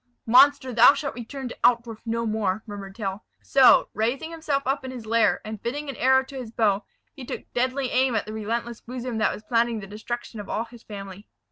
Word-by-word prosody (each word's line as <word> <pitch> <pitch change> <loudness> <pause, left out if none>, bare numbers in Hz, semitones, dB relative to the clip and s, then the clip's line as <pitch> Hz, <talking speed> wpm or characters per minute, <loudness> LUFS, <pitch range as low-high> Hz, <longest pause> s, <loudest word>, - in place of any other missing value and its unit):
"Monster, 260 +2 +5
thou 240 +4 +7
shalt 285 -2 -3
return 250 +3 -7
to - - -8
Altdorf 235 -2 +1
no 230 +1 -1
more!" 215 -2 -1
murmured 200 -3 -8
Tell. 200 -2 -4 0.2
So, 270 -2 +6
raising 250 +9 -1
himself 305 -4 -2
up 270 +1 -1
in 260 - -5
his 250 -3 -8
lair, 230 +1 +2
and 215 -1 -6
fitting 285 +5 -4
an 275 - -5
arrow 265 +2 +4
to 270 0 -9
his 250 -4 -6
bow, 215 -3 +1 0.3
he 275 - -10
took - - -6
deadly 255 +1 0
aim 255 -1 +2
at 220 - 0
the 215 - -7
relentless 230 +2 -3
bosom 245 -1 -5
that 215 - +2
was 210 - -8
planning 230 0 +1
the 200 - -8
destruction 220 +3 -6
of 205 - -8
all 225 - -1
his 235 0 -15
family. 200 -2 -9
235 Hz, 215 wpm, -25 LUFS, 215-260 Hz, 0.3 s, thou